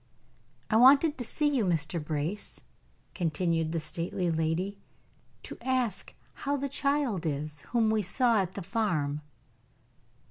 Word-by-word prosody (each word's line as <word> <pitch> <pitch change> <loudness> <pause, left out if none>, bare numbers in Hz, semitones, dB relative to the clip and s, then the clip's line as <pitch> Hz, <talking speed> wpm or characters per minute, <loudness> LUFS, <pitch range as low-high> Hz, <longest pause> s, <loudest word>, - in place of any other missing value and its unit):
"I 220 - +5
wanted 280 +5 +6
to - - -2
see 295 +5 0
you, 275 -6 +2
Mr. 165 -3 0
Brace," 155 +6 -3 0.5
continued 165 -1 0
the 165 - -1
stately 170 +2 -2
lady, 165 +5 -1 0.6
"to - - -8
ask 255 -6 -1 0.3
how 285 0 0
the 280 +1 -2
child 275 - 0
is 150 -1 -3
whom 225 -3 +2
we 220 -1 +2
saw 225 +3 +2
at 185 -1 -4
the 195 - -6
farm." 170 -8 -1
190 Hz, 135 wpm, -29 LUFS, 160-245 Hz, 0.6 s, wanted